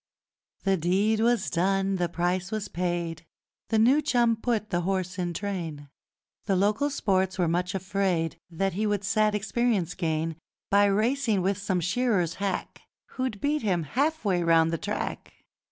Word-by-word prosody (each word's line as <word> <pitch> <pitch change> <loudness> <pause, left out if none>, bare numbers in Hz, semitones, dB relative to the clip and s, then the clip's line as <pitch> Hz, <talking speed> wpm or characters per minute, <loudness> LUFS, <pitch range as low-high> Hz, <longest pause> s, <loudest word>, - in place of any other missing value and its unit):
The 195 -1 +2
deed 195 +6 +1
was 230 -2 +2
done, 195 +2 +1
the 175 -1 0
price 180 +2 -1
was 215 -1 -3
paid, 170 -2 -2 0.5
The 225 - +2
new 255 +7 +5
chum 240 -5 +2
put 220 -2 -2
the 175 -1 +1
horse 185 0 -2
in 175 -1 -1
train: 170 -6 -5 0.6
The 195 - +1
local 210 +10 +2
sports 190 -7 0
were 175 -2 +2
much 180 +2 -1
afraid 190 -4 -1
That 195 +3 -1
he 215 +4 0
would 205 -1 0
sad 210 +1 +2
experience 210 -4 0
gain, 160 -2 -2 0.3
By 200 +1 +5
racing 215 0 +1
with 195 +1 0
some 190 -3 -1
shearer's 190 -2 +1
hack, 200 -2 -3 0.3
Who'd 255 -6 -3
beat 300 +1 +1
him 185 -6 0
half 285 - -1
way 185 -3 +2
round 165 -1 +4
the 165 - -1
track. - - -4
195 Hz, 160 wpm, -27 LUFS, 175-215 Hz, 0.6 s, new